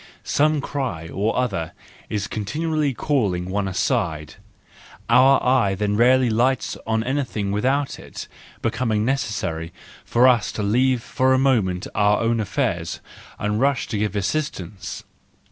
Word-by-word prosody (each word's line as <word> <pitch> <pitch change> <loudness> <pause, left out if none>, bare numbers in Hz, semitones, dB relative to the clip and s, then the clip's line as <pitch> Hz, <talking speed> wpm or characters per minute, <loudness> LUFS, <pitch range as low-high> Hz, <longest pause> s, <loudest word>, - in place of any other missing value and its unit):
Some 150 0 +2
cry 125 - -4
or 105 +5 -1
other 100 -10 -1 0.4
is 105 -2 -2
continually 150 +9 -1
calling 100 -10 -1
one 100 0 -1
aside: 80 -6 -1 0.8
our 130 +3 +6
eye 125 -7 +3
then 105 +1 -1
rarely 125 +3 +4
lights 120 +4 +1
on 110 0 +1
anything 120 -6 -2
without 135 +7 0
it - - -9 0.4
becoming 115 -2 0
necessary 105 -11 -2 0.3
for 120 +2 +4
us 120 -4 +3
to 105 - -3
leave 125 +3 +2
for 130 0 +2
a - - +3
moment 110 -10 +1
our 105 0 +3
own 115 0 +1
affairs 90 -5 -2 0.4
and 105 +2 -1
rush 140 -1 +2
to 110 - -2
give 105 -1 -1
assistance. 100 - -3
115 Hz, 135 wpm, -22 LUFS, 100-130 Hz, 0.8 s, our